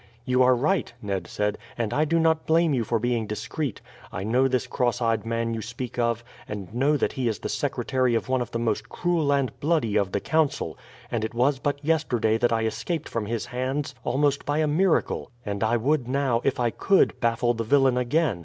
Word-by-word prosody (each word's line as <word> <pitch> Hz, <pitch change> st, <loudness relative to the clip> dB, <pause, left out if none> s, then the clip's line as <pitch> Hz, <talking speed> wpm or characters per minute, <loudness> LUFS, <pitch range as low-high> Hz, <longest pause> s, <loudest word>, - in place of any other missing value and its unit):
"You 130 Hz, 0 st, +2 dB
are 130 Hz, 0 st, +6 dB
right," 155 Hz, +9 st, 0 dB
Ned 100 Hz, -5 st, -3 dB
said; 105 Hz, 0 st, -2 dB, 0.2 s
"and 115 Hz, -3 st, -1 dB
I 155 Hz, -, +2 dB
do 165 Hz, +2 st, +1 dB
not 160 Hz, -1 st, +2 dB
blame 165 Hz, -1 st, +3 dB
you 125 Hz, -3 st, +1 dB
for 115 Hz, +2 st, 0 dB
being 115 Hz, -1 st, -1 dB
discreet. 115 Hz, +5 st, -4 dB, 0.3 s
I 95 Hz, -, -4 dB
know 125 Hz, +5 st, +3 dB
this 130 Hz, -2 st, 0 dB
cross 120 Hz, -1 st, 0 dB
eyed 115 Hz, -2 st, 0 dB
man 115 Hz, 0 st, -1 dB
you 115 Hz, -, -3 dB
speak 120 Hz, +2 st, -6 dB
of, 115 Hz, -1 st, 0 dB, 0.2 s
and 100 Hz, -2 st, -6 dB
know 140 Hz, +5 st, +2 dB
that -, -, 0 dB
he 130 Hz, -2 st, -2 dB
is 110 Hz, -3 st, 0 dB
the -, -, -5 dB
secretary 130 Hz, -3 st, 0 dB
of 115 Hz, -, -1 dB
one 130 Hz, -1 st, +1 dB
of 120 Hz, -, -3 dB
the 115 Hz, -, -3 dB
most 115 Hz, -1 st, -1 dB
cruel 170 Hz, -5 st, 0 dB
and 140 Hz, -5 st, +1 dB
bloody 140 Hz, -9 st, +1 dB
of 100 Hz, -2 st, +1 dB
the 100 Hz, -, 0 dB
Council; 155 Hz, +5 st, 0 dB, 0.4 s
and 115 Hz, -3 st, -1 dB
it 110 Hz, -, -4 dB
was 130 Hz, +3 st, +2 dB
but 145 Hz, +1 st, -2 dB
yesterday 120 Hz, -9 st, +1 dB
that 120 Hz, 0 st, +2 dB
I 115 Hz, -1 st, +1 dB
escaped 160 Hz, +8 st, -3 dB
from 110 Hz, -3 st, -3 dB
his 115 Hz, 0 st, -2 dB
hands 130 Hz, +3 st, -3 dB
almost 140 Hz, +2 st, +1 dB
by 145 Hz, +1 st, -1 dB
a 155 Hz, -, +3 dB
miracle. 165 Hz, +4 st, +1 dB, 0.2 s
And 100 Hz, 0 st, -2 dB
I 115 Hz, +2 st, +2 dB
would 130 Hz, +2 st, +1 dB
now, 130 Hz, -3 st, +1 dB
if 135 Hz, -, 0 dB
I 120 Hz, -1 st, +2 dB
could, 195 Hz, -, +2 dB
baffle 120 Hz, 0 st, +1 dB
the 115 Hz, -1 st, -3 dB
villain 135 Hz, +2 st, +3 dB
again. 125 Hz, -, +1 dB
125 Hz, 220 wpm, -25 LUFS, 115-145 Hz, 0.4 s, are